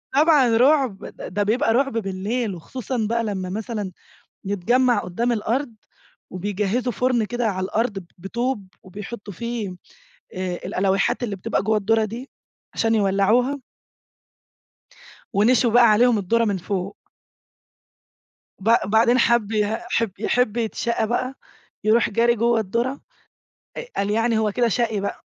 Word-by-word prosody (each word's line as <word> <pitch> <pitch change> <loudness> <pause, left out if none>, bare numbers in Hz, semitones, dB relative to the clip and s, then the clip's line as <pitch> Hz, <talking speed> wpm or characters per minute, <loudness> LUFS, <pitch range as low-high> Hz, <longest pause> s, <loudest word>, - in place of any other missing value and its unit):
طبعًا 285 -7 +5
رعب 265 -5 +3 0.2
ده 205 +3 -3
بيبقى 225 +2 +2
رعب 275 0 +1
بالليل، 200 +2 -2
وخصوصًا 240 +5 -4
بقى 230 0 0
لمّا 190 -4 -3
مثلًا 210 -1 -4 0.6
نتجمّع 240 +6 +2
قدام 235 +7 -1
الأرض 235 +3 -1 0.6
وبيجهزوا 205 +6 -1
فرن 245 -1 +1
كده 240 +1 -2
على 185 -2 -2
الأرض 205 -2 -1
بطوب 230 +2 -3 0.2
وبيحطوا 205 +2 -8
فيه 225 -4 -4 0.6
آآ 185 -1 -3
الألويحات 195 +6 +1
اللي 205 -4 -3
بتبقى 185 - -1
جوا 215 +2 +1
الدُرة 220 +2 +2
دي 235 +5 -7 0.4
عشان 225 0 +1
يولّعوها. 215 +7 +2 1.7
ونشوي 230 +3 +3
بقى 240 -2 +7
عليهم 235 +1 +4
الدُرة 230 +4 +1
من 200 -3 0
فوق. 190 +2 -4 1.6
ب 210 +4 -1 0.2
بعدين 230 +4 +4
حَب 235 -3 +2
ي 210 0 +1
حَب 230 -4 0
يحِب 240 0 +1
يتشاقى 230 0 -1
بقى 255 +3 -2 0.5
يرُوح 220 +2 +3
جاري 235 +3 +3
جوّه 235 0 +2
الدُرة 235 +7 -2 0.8
آآ، - - -5
قال 200 +1 0
يعني 225 +1 +1
هو 215 -2 +1
كده 240 +2 +1
شقي 225 -1 0
بقى. 200 - -5
225 Hz, 130 wpm, -22 LUFS, 200-240 Hz, 1.7 s, بقى